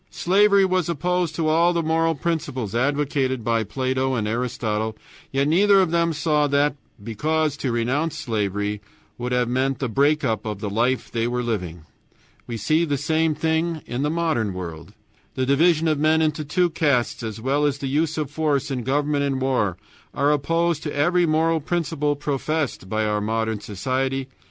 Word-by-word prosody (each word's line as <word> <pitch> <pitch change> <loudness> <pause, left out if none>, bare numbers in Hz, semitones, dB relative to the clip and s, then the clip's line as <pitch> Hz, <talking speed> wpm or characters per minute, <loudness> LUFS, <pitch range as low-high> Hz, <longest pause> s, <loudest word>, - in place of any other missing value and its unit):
Slavery 200 +2 +4
was 185 -3 0
opposed 175 0 -1
to 160 -1 0
all 165 +3 +3
the 170 -1 0
moral 165 +1 +1
principles 145 - -3
advocated 135 -1 0
by 115 0 +1
Plato 130 +3 -1
and 110 -3 -1
Aristotle, 110 -2 -2 0.3
yet 135 +1 +1
neither 195 +5 +5
of 185 -4 +2
them 170 0 +2
saw 150 -1 +1
that, 145 0 +2 0.3
because 150 +7 0
to 130 - -2
renounce 130 +7 -1
slavery 105 -2 -2 0.4
would 125 +1 -3
have 125 -1 +1
meant 130 +2 0
the 135 - -2
break 145 +6 +2
up 110 -5 0
of 105 -2 -4
the 105 -1 -4
life 120 +5 0
they 115 0 0
were 125 0 -1
living. 90 -8 -3 0.6
We 115 - -4
see 155 +10 +2
the 145 -4 0
same 160 +2 +1
thing 160 +1 -1
in 120 +4 -3
our 150 - +1
modern 155 - 0
world. 85 -3 -7 0.4
The 130 - 0
division 160 +4 +3
of 155 -2 +1
men 155 +1 +3
into 155 -1 0
two 175 +4 +1
castes, 145 -7 +1
as 110 -1 -5
well 135 +5 0
as 140 -1 -1
the 140 - -5
use 155 +4 0
of 150 -3 -2
force 150 -2 0
in 130 -2 -2
government 145 +3 0
and 135 -2 -1
war, 125 -9 0 0.4
are 140 +1 +2
opposed 165 +2 +1
to 150 - -5
every 175 +4 +2
moral 160 +1 +2
principle 155 -2 -1
professed 145 -6 -2
by 110 +1 0
our 105 0 0
modern 110 0 -1
society. 130 +6 -2
140 Hz, 180 wpm, -23 LUFS, 120-160 Hz, 0.6 s, neither